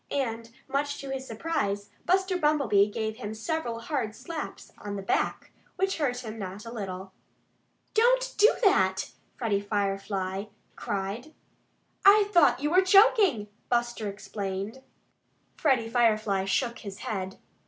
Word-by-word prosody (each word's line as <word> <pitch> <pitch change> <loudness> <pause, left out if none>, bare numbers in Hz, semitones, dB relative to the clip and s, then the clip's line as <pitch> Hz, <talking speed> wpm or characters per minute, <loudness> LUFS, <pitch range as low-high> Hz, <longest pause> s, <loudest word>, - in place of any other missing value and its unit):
And 230 -4 -2 0.2
much 285 +1 -1
to 275 -1 -6
his 265 0 -4
surprise, 205 -6 -2 0.2
Buster 380 +1 +2
Bumblebee 280 - +3
gave 220 +1 -3
him 220 -3 -5
several 235 -1 -3
hard 230 -6 -2
slaps 310 +5 -7
on 205 -1 -5
the 195 - -5
back, - - -1 0.2
which 385 -1 0
hurt 250 -4 -1
him 220 0 -6
not 195 +2 -6
a 230 - -7
little. 190 -3 -6 0.8
"Don't - - +3
do 425 +3 +7
that!" 190 - +3 0.3
Freddie 210 -4 0
Firefly 195 -1 -2 0.3
cried. 205 +9 -4 0.7
"I 405 +1 +7
thought 340 -8 +5
you 295 +1 0
were 365 +2 +6
choking," 380 - +5 0.2
Buster, 240 -3 0
explained. 200 +3 -5 0.7
Freddie 260 -7 +2
Firefly 215 -4 +2
shook 235 +4 0
his 200 -2 -8
head. 190 -2 -3
230 Hz, 130 wpm, -28 LUFS, 200-295 Hz, 0.8 s, do